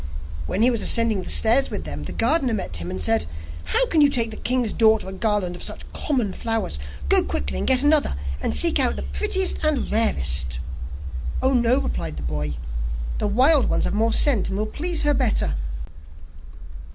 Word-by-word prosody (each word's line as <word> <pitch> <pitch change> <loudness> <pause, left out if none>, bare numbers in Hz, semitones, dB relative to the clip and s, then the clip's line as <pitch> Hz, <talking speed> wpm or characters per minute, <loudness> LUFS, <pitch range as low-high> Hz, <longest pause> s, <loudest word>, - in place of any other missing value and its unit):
When 215 - 0
he 250 - +5
was 230 -3 -1
ascending 230 -4 +2
the 180 - -7
stairs 240 +5 +5
with - - -4
them, 75 -1 -6
the - - -6
gardener 255 0 +1
met 90 - -3
him, 85 +1 -5
and 95 +1 -5
said: 85 +1 +1 0.4
'How - - +2
can 325 -10 +2
you 290 - +6
take 235 -5 +1
the - - -5
king's 245 -3 -1
daughter 220 -3 +3
a 190 - -6
garland 195 -3 -1
of - - -10
such - - -6
common 245 -10 -1
flowers? 225 - -3 0.3
Go - - +5
quickly, 70 -1 -3
and - - -2
get 260 0 +4
another, 295 - +3 0.3
and 75 - -1
seek 75 - +2
out - - +2
the 70 - -5
prettiest 70 - 0
and 305 -4 0
rarest.' 70 - 0 0.8
'Oh, 265 +1 +2
no,' 245 0 +3
replied 80 - -4
the 70 - -6
boy, 75 +1 -3 0.6
'the - - 0
wild 260 +7 +4
ones - - +1
have - - -1
more 225 +2 +1
scent, 225 -4 +2
and 195 - -3
will 210 - -1
please 330 +9 -2
her 295 0 +3
better. 250 -6 +1
220 Hz, 195 wpm, -23 LUFS, -, 0.8 s, you